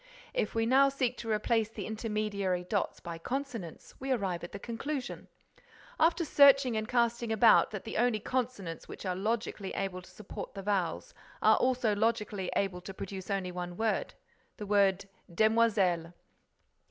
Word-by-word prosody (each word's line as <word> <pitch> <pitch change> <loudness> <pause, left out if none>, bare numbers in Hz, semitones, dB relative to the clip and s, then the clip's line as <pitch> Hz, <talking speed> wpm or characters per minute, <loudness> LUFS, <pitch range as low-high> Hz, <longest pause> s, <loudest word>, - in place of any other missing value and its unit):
If - - -1
we 225 0 +2
now 270 +3 +5
seek 255 -3 -1
to 230 - -6
replace 220 0 +1
the 210 -3 -6
intermediary 210 -4 -2
dots 200 +3 -2
by 170 -1 -7
consonants, 245 - -5
we 270 +1 -3
arrive 195 -8 -1
at 175 - -7
the - - -6
conclusion, 250 +6 -5 0.7
after 330 +1 +3
searching 275 -4 +6
and 215 0 -2
casting 235 -1 +1
about, 220 +1 +6
that 205 -3 -6
the 225 - -5
only 240 -1 +2
consonants 225 -9 -3
which - - -9
are 185 -1 -1
logically 210 0 -2
able 190 -2 -3
to 180 - -16
support 210 0 -8
the 195 - -6
vowels 190 -5 -1 0.3
are 220 0 +6
also 250 -4 +2
logically 210 -3 0
able 185 -2 -1
to 190 +1 -9
produce 190 0 -7
only 195 -2 -1
one 175 0 -5
word, 220 -1 -1 0.4
the 210 - -6
word 200 -2 +3 0.3
demoiselles." 200 -5 +2
215 Hz, 160 wpm, -31 LUFS, 190-235 Hz, 0.7 s, searching